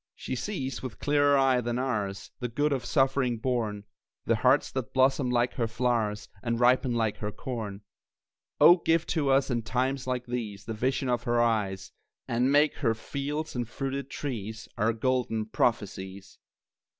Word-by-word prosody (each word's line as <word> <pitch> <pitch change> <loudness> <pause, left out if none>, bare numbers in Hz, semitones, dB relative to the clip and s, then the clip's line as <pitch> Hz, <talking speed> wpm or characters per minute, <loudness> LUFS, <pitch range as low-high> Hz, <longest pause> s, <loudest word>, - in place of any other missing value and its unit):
She - - -4
sees 135 - -4
with 130 -4 -6
clearer 145 -1 +3
eye 135 -2 +3
than 120 0 -2
ours 105 -7 -2
The 125 - -2
good 145 +5 0
of 130 - -2
suffering 135 -3 +2
born, 110 -4 -2 0.4
The - - +2
hearts - - +3
that 130 -3 -4
blossom 130 0 +3
like 120 0 +1
her 115 -4 -1
flowers, 115 -3 -1
And 115 +1 -1
ripen 125 0 +3
like 110 -3 0
her 105 -1 -4
corn. 105 -5 -5 0.8
Oh, 175 - +8
give 165 -1 +1
to 150 -5 +1
us, 135 0 +3
in 120 -1 0
times 130 +3 -1
like 125 -1 -2
these, 110 -5 -5
The 115 - -4
vision 130 +4 -1
of 120 -1 +1
her 120 0 +2
eyes; 105 -5 0 0.4
And 125 +3 +1
make 145 +2 +4
her 115 -6 +1
fields 145 +6 -4
and 120 -2 -2
fruited 135 +2 -4
trees 110 -5 -5
Our 110 +2 +2
golden 115 -2 0
prophecies! 100 -4 -2
125 Hz, 165 wpm, -28 LUFS, 110-135 Hz, 0.8 s, Oh